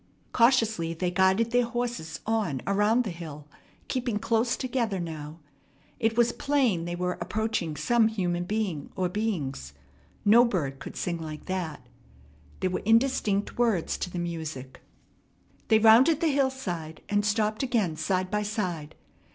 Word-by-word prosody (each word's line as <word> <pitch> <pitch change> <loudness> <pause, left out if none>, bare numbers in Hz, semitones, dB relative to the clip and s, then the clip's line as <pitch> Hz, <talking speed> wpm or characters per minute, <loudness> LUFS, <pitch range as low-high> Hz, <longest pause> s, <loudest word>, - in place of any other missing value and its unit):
Cautiously 225 -9 +3
they 180 +2 -1
guided 190 +5 +3
their 245 0 +3
horses 235 -9 -4
on 210 - -1
around 210 +5 +3
the 210 - -4
hill, 155 -4 -9 0.4
keeping 245 -4 -1
close 230 +2 +1
together 235 -6 -1
now. 155 -2 -6 0.6
It 225 -1 +1
was 240 0 +4
plain 255 -12 +1
they 175 0 -3
were 180 0 -2
approaching 220 -8 -2
some 220 +10 +3
human 175 -5 -1
being 195 -7 -2
or 185 -1 0
beings. 160 - -3 0.5
No 225 +4 +7
bird 155 - -1
could - - -8
sing 170 -2 -2
like 155 -1 -7
that. 180 -5 -4 0.8
There 185 - +1
were - - -1
indistinct 225 -3 +2
words 225 -9 +1
to - - -3
the 180 - -6
music. 160 -6 -5 0.9
They 220 - +5
rounded 230 +8 +6
the 330 - +2
hillside, 260 - -2
and 205 0 +1
stopped 215 0 0
again 230 - 0
side 185 +3 -1
by 210 0 +1
side. 185 -8 -3
205 Hz, 145 wpm, -27 LUFS, 170-230 Hz, 0.9 s, No